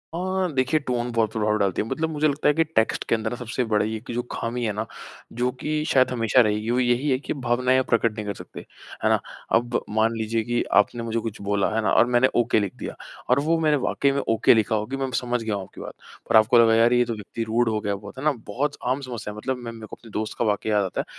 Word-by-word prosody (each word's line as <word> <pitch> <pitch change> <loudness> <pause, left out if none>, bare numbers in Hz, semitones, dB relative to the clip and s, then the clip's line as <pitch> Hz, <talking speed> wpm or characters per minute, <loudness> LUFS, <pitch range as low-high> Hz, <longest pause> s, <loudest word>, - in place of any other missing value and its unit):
अ, - - -2 0.4
देखिए 130 +4 +2
टोन 120 -1 -1
बहुत 115 -2 +1
प्रभाव 105 -1 0
डालती 100 -4 0
है। 110 - -4
मतलब 160 +6 -2
मुझे 155 -1 +1
लगता 145 0 0
है 150 - +5
कि 165 +2 +3
टेक्स्ट 150 -8 0
के - - +4
अंदर 110 +1 -3
सबसे 125 +1 -3
बड़ा 105 -1 +2
ये 110 - -3
है 110 - -3
कि - - -5
जो 120 - 0
ख़ामी 120 +1 -3
है 105 - -1
ना 110 +2 -3 0.5
जो 125 +1 +1
कि 150 - -3 0.2
शायद 130 -1 +4
हमेशा 120 +1 +3
रहेगी, 105 0 0
वो 125 - +2
यही 125 +3 +1
है 130 - +3
कि - - -4
भावनाएँ 125 +2 +2
आप 130 - -2
प्रकट 115 -1 +3
नहीं 105 -1 -5
कर 100 - -3
सकते। - - -10 0.4
है - - +3
ना? - - +3 0.4
अब 120 +1 -1
मान 110 +2 +2
लीजिए 110 0 -1
कि 120 +1 0 0.2
आपने 115 +3 -6
मुझे 115 0 -1
कुछ 115 -1 -6
बोला, 100 0 0
है 115 - +2
ना? 95 - +1
और - - +6
मैंने 125 +1 +3
ओके 115 - +2
लिख 100 -3 -3
दिया - - -6 0.3
और 125 +2 +4
वो 165 +1 +3
मैंने 155 -2 +3
वाक़ई 140 - +1
में 140 - -1
ओके 115 -1 +5
लिखा 110 -1 +1
हो 105 0 -1
कि 135 +4 -5
मैं 135 -1 -2
समझ 120 -1 -1
गया 110 -2 -1
हूँ 100 - -4
आपकी - - -12
बात। - - -7 0.4
पर - - +3
आपको 110 +3 +5
लगा, 115 -1 +5
"यार, 115 +2 +4
ये 120 0 +4
तो 115 - -3
व्यक्ति 110 +2 -5
रूड 115 +1 +1
हो 110 -1 0
गया 100 -1 -2
बहुत।" 100 +2 -11
है - - -6
ना? 155 - +4 0.2
बहुत 140 +8 -2 0.2
आम 140 - -5
समस्या 120 -5 -6
है। 105 - -12
मतलब 130 +4 -2
मैं 120 -2 -7
मैं 110 -2 -10
को - - -9
अपने 115 - -16
दोस्त 110 +1 -4
का 120 - +2
वाक़या 105 0 0
याद 100 -1 +2
आता 95 - -2
है। - - -9
115 Hz, 280 wpm, -24 LUFS, 110-125 Hz, 0.5 s, और